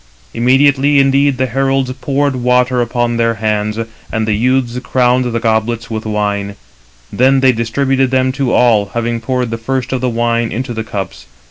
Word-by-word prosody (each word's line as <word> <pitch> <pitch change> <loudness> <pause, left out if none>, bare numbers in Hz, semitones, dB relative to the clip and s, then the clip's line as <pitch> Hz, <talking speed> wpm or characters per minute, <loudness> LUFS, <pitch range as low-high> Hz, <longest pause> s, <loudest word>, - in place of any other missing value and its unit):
Immediately 135 +3 +3
indeed 135 0 +3
the 130 - +1
heralds 135 +1 0
poured 140 0 -1
water 125 0 +2
upon 120 -1 -1
their 115 0 +1
hands, 105 0 -1 0.3
and 110 -1 -1
the 110 - +1
youths 125 +2 0
crowned 125 0 +1
the 115 -1 -1
goblets 115 0 -1
with 110 0 -4
wine; 100 -1 -2 0.6
then 130 +5 +3
they 130 0 +4
distributed 130 +3 0
them 130 0 +1
to 135 -2 -1
all, 110 -5 +3
having 115 0 -2
poured 125 0 -2
the 115 - -4
first 130 +2 -3
of 130 - -2
the 130 - 0
wine 115 0 0
into 125 +1 -4
the 110 0 -4
cups. 100 - -6
125 Hz, 170 wpm, -15 LUFS, 115-130 Hz, 0.6 s, they